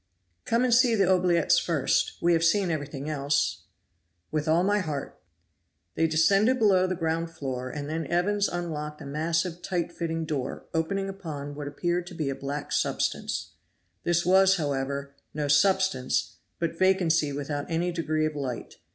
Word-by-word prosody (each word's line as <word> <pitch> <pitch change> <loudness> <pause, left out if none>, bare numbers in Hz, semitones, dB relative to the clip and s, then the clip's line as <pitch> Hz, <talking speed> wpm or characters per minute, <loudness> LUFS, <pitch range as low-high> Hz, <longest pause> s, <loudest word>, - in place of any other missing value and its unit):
"Come 230 +2 +2
and 250 -2 +3
see 240 -1 +5
the 200 -2 +3
oubliettes 180 -3 +3
first. 155 -6 +1
We 175 0 +4
have 165 0 +2
seen 180 +2 +3
everything 145 -2 -4
else." 140 -2 0 0.7
"With 155 0 -1
all 165 +3 +3
my 205 +2 +2
heart!" 150 -7 -5 0.7
They 165 - +2
descended 195 +10 +3
below 195 -5 +4
the 185 - -1
ground 165 0 -1
floor, 130 -6 -5
and 145 +2 -5
then 160 0 -3
Evans 200 +5 +1
unlocked 150 -4 -4
a - - -8
massive 165 +4 -1
tight 175 -1 -2
fitting 165 -1 -3
door 140 -5 -4
opening 195 +4 -1
upon 155 -7 -6
what 145 0 -6
appeared 175 +4 -2
to 180 - -9
be 155 -4 -1
a - - -4
black 140 +2 -5
substance; - - -1 0.5
this 175 0 +1
was, 190 +1 +5
however, 140 -2 -2 0.2
no 150 -1 -1
substance 150 -5 +2 0.2
but 165 0 -3
vacancy 170 -5 +3
without 145 +1 -4
any 170 +2 0
degree 155 -2 0
of 155 -1 -2
light. 130 -5 -5
165 Hz, 160 wpm, -27 LUFS, 145-180 Hz, 0.7 s, see